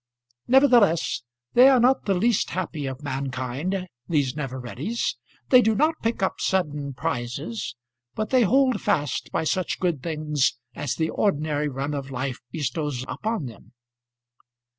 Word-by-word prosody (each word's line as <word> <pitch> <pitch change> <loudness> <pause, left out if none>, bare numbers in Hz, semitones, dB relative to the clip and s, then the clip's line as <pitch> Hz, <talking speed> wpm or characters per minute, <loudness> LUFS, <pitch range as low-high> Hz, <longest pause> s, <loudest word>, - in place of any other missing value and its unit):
Nevertheless 240 - +4 0.3
they 255 +2 +8
are 265 -2 +5
not 255 +3 +3
the 195 - +2
least 225 +4 +2
happy 160 -5 -3
of 135 +2 -6
mankind, 135 +7 -3 0.2
these 145 -5 +1
never 135 -3 -4
readies; 145 - -3 0.3
they 255 -1 +8
do 220 -1 +2
not 310 +7 +3
pick 230 -3 -1
up 190 - 0
sudden 150 -7 -1
prizes, 125 - -3 0.4
but 215 0 -3
they 255 -1 +5
hold 255 +3 +3
fast 150 -9 -1
by - - 0
such 180 +3 -1
good 170 -7 0
things 150 -4 0 0.2
as 140 - -3
the 160 -1 -1
ordinary 150 -6 0
run 140 +2 -3
of 140 -2 -4
life 130 -1 -3
bestows 150 -3 -2
upon 220 -8 -3
them. 115 0 -11
155 Hz, 145 wpm, -25 LUFS, 135-215 Hz, 0.4 s, they